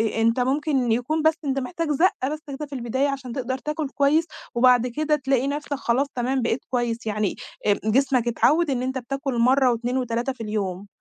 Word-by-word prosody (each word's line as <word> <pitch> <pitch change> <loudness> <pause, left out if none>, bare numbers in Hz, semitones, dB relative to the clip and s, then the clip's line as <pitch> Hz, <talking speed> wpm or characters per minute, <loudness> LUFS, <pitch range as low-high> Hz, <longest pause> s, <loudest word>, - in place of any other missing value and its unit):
آآ - - -1
آآ - - +2
أنت 230 +2 +3
ممكن 265 -1 +1
يكون 250 +8 0
بس 315 +1 +4
أنت 275 -1 0
محتاج 330 +4 -3
زقّة 295 -3 +2
بس 305 - -4
كده 285 +1 -5
في 290 - -12
البداية 260 +3 0
عشان 265 -3 -5
تقدر 260 0 -2
تاكل 300 +1 -3
كويّس، 290 +4 +2 0.3
وبعد 250 0 +5
كده 300 +5 0
تلاقي 270 -2 0
نفسَك 290 +1 -3
خلاص 265 +1 0
تمام 255 +2 0
بقيت 235 +1 -1
كويّس 240 -2 -1
يعني 210 -2 -1 0.3
آآ 205 - +3
جسمَك 255 +1 +2
اتعوّد 300 +7 +3
إن 255 -3 0
أنت 260 +1 -2
بتاكل 270 +1 -3
مرّة 255 +2 +4
و2 240 +2 -1
و3 245 +1 -1
في 245 - -12
اليوم، 200 -3 -3
260 Hz, 200 wpm, -24 LUFS, 235-280 Hz, 0.3 s, وبعد